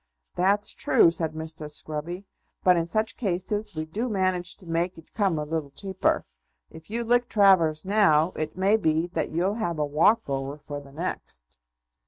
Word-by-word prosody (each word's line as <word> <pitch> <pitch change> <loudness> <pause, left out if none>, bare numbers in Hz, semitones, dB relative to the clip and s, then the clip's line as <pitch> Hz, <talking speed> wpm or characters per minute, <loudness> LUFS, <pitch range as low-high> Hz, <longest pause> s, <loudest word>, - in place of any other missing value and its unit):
"That's 200 +3 +1
true," 165 - +4
said 160 -2 -2
Mr. 155 -1 -6
Scruby; 155 +5 -4 0.4
"but 180 -1 +6
in 165 -1 0
such 215 +5 -1
cases 205 -1 -2
we 155 0 -3
do 215 +10 -3
manage 185 -3 0
to 185 - -15
make 170 +2 -1
it 165 - -15
come 195 -6 +1
a 150 - -1
little 155 -2 -3
cheaper. 190 +6 -1 0.5
If 160 +3 -13
you 235 +2 -2
lick 240 +1 +2
Travers 185 -7 +4
now, 185 -5 +4
it 155 +1 -5
may 195 +3 +4
be 160 -5 +1
that - - -1
you'll 175 +5 0
have 170 -6 -1
a 150 - +1
walk 165 +10 +3
over 135 +1 -3
for 145 0 -7
the 140 -1 -14
next." - - -5
170 Hz, 180 wpm, -26 LUFS, 155-200 Hz, 0.5 s, but